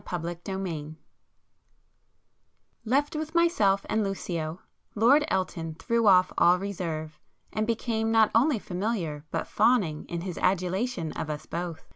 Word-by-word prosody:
[p - - -4
146]XIII 170 -2 -5 1.9
Left 280 +6 +1
with 310 +1 -4
myself 210 - +3
and 220 0 +1
Lucio, 175 -4 -3 0.4
Lord 250 +8 +5
Elton 165 - -2
threw 230 +5 0
off 185 -2 +5
all 175 +1 +6
reserve, 165 -5 -5 0.3
and 215 0 -1
became 225 -1 -1
not 225 -1 +4
only 255 +4 +4
familiar, 180 -7 -3
but - - -2
fawning 205 -9 +2
in 170 -1 -4
his 180 -1 -5
adulation 185 0 0
of 155 - -5
us 150 0 -5
both. 170 -1 -5
190 Hz, 130 wpm, -27 LUFS, 170-225 Hz, 1.9 s, all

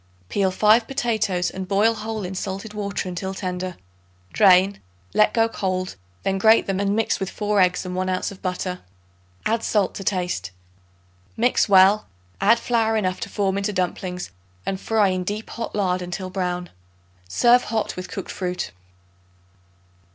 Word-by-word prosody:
Peel 195 -2 +1
5 215 +4 +4
potatoes 220 -9 0
and 190 0 -6
boil 205 +4 +3
whole 215 -2 -4
in 180 - -5
salted 195 +3 -5
water 200 -2 -3
until 190 +2 -4
tender. 185 -2 -4 0.6
Drain, 195 -1 +5 0.3
let 215 - +4
get 225 0 +1
cold, 185 -2 -2 0.3
then 195 0 0
grate 220 +2 +5
them 195 -1 -1
and 200 0 +1
mix 225 0 +1
with 195 -1 -2
4 210 -1 +1
eggs 180 0 +2
and 180 0 -4
1 185 0 -1
ounce 185 +1 -1
of 195 - -12
butter; 180 0 -3 0.7
add 225 +1 +1
salt 205 -3 +1
to 195 - -6
taste. 180 - -1 0.9
Mix 235 -1 +2
well; 195 +2 +6 0.3
add 235 - +5
flour 225 -2 +1
enough 185 -3 -1
to - - -5
form 195 -1 0
into 200 +1 -1
dumplings 180 -1 -3 0.3
and 190 -1 -3
fry 215 -3 +2
in 185 -1 -1
deep 210 +4 -4
hot 230 - -5
lard 185 -3 +1
until 180 +1 -5
brown. 180 -2 -3 0.6
Serve 240 - +4
hot 220 0 -2
with 185 - -6
cooked 195 - -6
fruit. 180 -1 -3
195 Hz, 160 wpm, -23 LUFS, 185-215 Hz, 0.9 s, well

